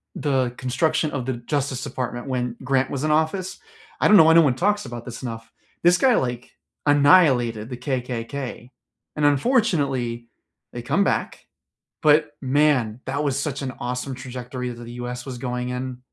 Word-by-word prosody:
the 130 -4 0
construction 155 +5 0
of 130 -4 -3
the 130 - -1
Justice 130 +2 -3
Department 120 -1 -4
when 125 -2 -2
Grant 135 0 +1
was 140 0 -3
in 155 - +1
office, 160 +5 0 0.4
I - - +5
don't 210 - +7
know 160 - +9
why 160 +1 +6
no 165 - +8
one 140 -6 +2
talks 205 +6 +1
about 120 -2 -7
this 120 -2 -8
enough, 115 -2 -7 0.3
this 175 +1 +5
guy, 255 +2 +4
like, 125 -1 -2 0.4
annihilated 140 -7 +4
the 125 - -6
KKK, 125 0 -4 0.5
and 150 - +2
unfortunately, 140 - +1 0.4
they - - -6
come - - +1
back, - - -2 0.6
but 150 0 +4
man, 130 -5 +2
that 145 - -1
was 140 -2 0
such 145 -1 -3
an 130 -2 -3
awesome 125 +2 -4
trajectory 125 0 -6
that 120 0 -9
the 120 0 -9
US 125 0 -5
was 130 -3 -7
going 125 0 -3
in, 125 0 -4
130 Hz, 170 wpm, -23 LUFS, 125-150 Hz, 0.6 s, know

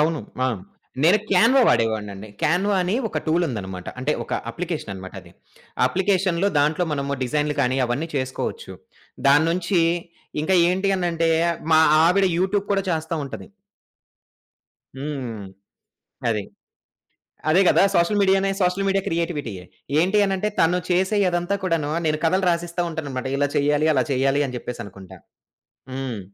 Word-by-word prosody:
అవును. 155 +1 +1 0.2
ఆ! - - +3 0.6
నేను 180 +7 +5
'క్యాన్వా' 230 +8 +5
వాడేవాడినండి. 110 -3 0
'క్యాన్వా' 190 +5 +2
అని 180 +3 -1
ఒక - - -2
టూల్ 170 +2 +2
ఉందనమాట. 95 -7 -6
అంటే 135 +4 0
ఒక - - -9 0.2
అప్లికేషన్ 165 - -5
అనమాట 95 0 -9
అది. - - -17 0.5
ఆ - - +1
అప్లికేషన్‌లో 190 +2 +1
దాంట్లో 155 +5 +2
మనము 140 -1 -2
డిజైన్లు 150 +4 0
గాని 130 -1 +1
అవన్నీ 130 +7 -2
చేసుకోవచ్చు. 130 -1 -4 0.5
దాని 145 +3 +5
నుంచి 175 +1 +1 0.6
ఇంకా 190 +5 +1
ఏంటి 190 +2 0
అనంటే 165 -2 0 0.4
మా 160 - +7 0.2
ఆవిడ 190 +3 +4
యూట్యూబ్ 195 +2 0
కూడా 195 -1 +1
చేస్తా 160 0 -2
ఉంటది. 140 - -8 1.5
హ్మ్. 135 -7 -5 0.9
అది. 105 -3 -1 1.1
అదే 180 +5 +5
కదా! - - +5
సోషల్ 175 +4 +2
మీడియా‌నే 195 0 +3
సోషల్ 180 +2 +1
మీడియా 195 0 +2
క్రియేటివిటీ‌యే. 150 - -3 0.4
ఏంటి 190 +5 +2
అనంటే 195 +1 -1
తను 175 +2 +3
చేసేయి 190 +3 +2
అదంతా 175 +3 -1
కూడాను 165 -5 0
నేను 155 0 +1
కథలు 185 +3 +2
రాసిస్తా 170 +1 -2
ఉంటాననమాట. 140 -5 -4
ఇలా 145 +1 +1
చేయ్యాలి, 145 +1 +2
అలా 130 - +2
చేయ్యాలి 135 +1 +2
అని 125 -2 -6
జెప్పేసనుకుంటా. 100 -6 -9 0.7
హ్మ్. 130 -4 -4
160 Hz, 135 wpm, -22 LUFS, 130-185 Hz, 1.5 s, మా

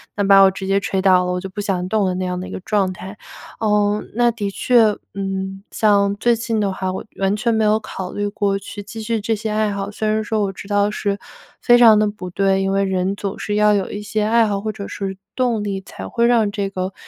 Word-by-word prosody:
那 205 - 0
把 195 0 +6
我 190 - +7
直 190 0 -6
接 195 +1 +2
吹 195 -1 -2
倒 185 -1 +4
了 180 - -1
我 180 - -2
就 195 - -6
不 205 +2 -8
想 185 -3 -2
动 215 -3 +1
了 185 - 0
那 185 - -2
样 180 0 -3
的 185 - -6
一 - - -9
个 - - -5
状 195 -2 0
态。 190 +3 -9 0.4
呃， 210 -1 +1
那 240 0 +3
的 210 -3 -3
确， 220 0 +3 0.2
嗯， 195 0 -4
像 200 -2 +2
最 240 +3 +2
近 230 -1 -2
的 200 -1 0
话 190 0 -3
我 - - -5 0.2
完 195 +1 +1
全 230 +2 0
没 220 -1 +2
有 210 +1 +4
考 190 -3 -6
虑 205 0 -2
过 205 -1 0
去 205 +1 -8
继 215 +2 -8
续 225 +1 -1
这 225 +2 -1
些 215 +1 -4
爱 215 0 +1
好， 200 0 -4
虽 215 +1 -3
然 215 0 +1
说 215 0 -1
我 195 -1 -2
知 200 - -10
道 205 0 +2
是 200 -1 -2 0.4
非 240 -1 +6
常 225 -3 +7
地 215 - +3
不 205 -3 -6
对， 195 +1 +1
因 195 0 0
为 195 0 +1
人 190 0 0
总 200 -1 -4
是 205 - -3
要 210 0 +4
有 200 -2 0
一 205 - -5
些 210 +1 -2
爱 225 +1 +3
好 200 -1 -2
或 215 0 -2
者 200 -1 -7
是 195 -1 -5 0.2
动 245 -4 0
力， 195 -1 -3
才 95 - -9
会 235 - +1
让 225 -4 +3
这 205 -1 -3
个， 190 0 -4
205 Hz, 280 characters per minute, -20 LUFS, 195-215 Hz, 0.4 s, 我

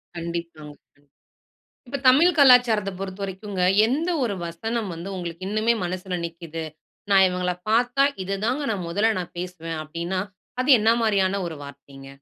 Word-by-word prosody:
கண்டிப்பாங்க, 170 -3 -6 0.2
கண் 145 0 -31 0.8
இப்ப 280 +3 -3
தமிழ் 310 +8 +6
கலாச்சாரத்த 245 -7 +5
பொறுத்தவரைக்குங்க, 195 0 -5 0.2
எந்த 305 +9 -1
1 215 -4 -1
வசனம் 220 +5 -3
வந்து 170 +4 -7
உங்களுக்கு 175 +1 -6
இன்னுமே 215 +3 +2
மனசுல 180 0 -3
நிக்குது? 165 -1 -7 0.5
"நா 195 - +5
இவுங்கள 180 0 -1 0.2
பார்த்தா, 245 +4 +3 0.2
இது 195 +1 -2
தாங்க 260 +5 -1
நா 205 - -2
மொதல்ல 215 +6 +1
நா - - -3
பேசுவேன்." 165 -3 -5
அப்படீன்னா, 170 +4 -3 0.4
அது 255 +3 +1
என்னா 225 +2 +4
மாரியான 200 -3 +1
ஒரு 160 - -7
வார்த்தைங்க? 140 -1 -12
190 Hz, 140 wpm, -24 LUFS, 170-225 Hz, 0.8 s, தமிழ்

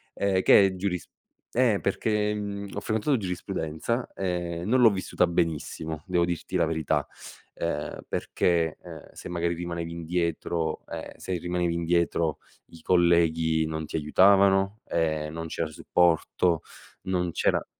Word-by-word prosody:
ehm, 95 -2 +1
che 100 - +7
è 95 - -4
giurisp 90 -2 -3 0.4
eh 120 -5 +3
perché, 105 +1 0
mhmm, 100 -1 -4
ho - - -1
frequentato 110 +7 +1
giurisprudenza 90 +2 -3
e 90 -2 -2
non 125 +5 +3
l'ho 115 - +8
vissuta 95 -2 +1
benissimo, 80 -1 -2
devo 90 -2 +2
dirti 85 -2 -4
la - - +3
verità, 80 -2 0 0.5
ehm, 75 -3 -3
perché, 85 -3 0
ehm, - - -11
se - - -9
magari 85 0 -1
rimanevi 85 -1 -4
indietro 85 -1 -2
ehm, - - -7
se 95 - -5
rimanevi 90 0 -1
indietro, 85 -1 0 0.3
i 85 - -15
colleghi 85 -2 +3
non 80 0 -3
ti 75 - -7
aiutavano, 95 +6 +4
ehm, 80 -2 -1
non 80 0 -5
c'era 80 0 -2
supporto, 85 +1 +2 0.4
non 90 -2 -1
c'era - - +1
85 Hz, 140 wpm, -27 LUFS, 80-95 Hz, 0.5 s, l'ho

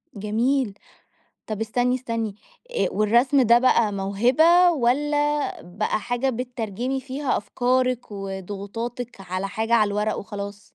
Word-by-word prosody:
جميل. 225 +3 0 0.7
طب 215 -1 -4
استني، 245 +3 +1
استني. 230 -4 -3 0.4
آآ 485 - +1
والرسم 240 +6 +3
ده 235 -1 +6
بقى 235 -4 +3
موهبة، 255 - +4
والّا 295 +2 0
بقى 190 +6 -2
حاجة 245 +4 -1
بتترجمي 250 +1 -3
فيها 270 +1 -2
أفكارِك 250 +2 0
وضغوطاتِك 200 +5 -6
على 185 +1 -3
حاجة 220 +3 -2
على 215 -3 +5
الورق 210 +1 -1
وخلاص؟ 200 0 -6
235 Hz, 115 wpm, -24 LUFS, 205-255 Hz, 0.7 s, ده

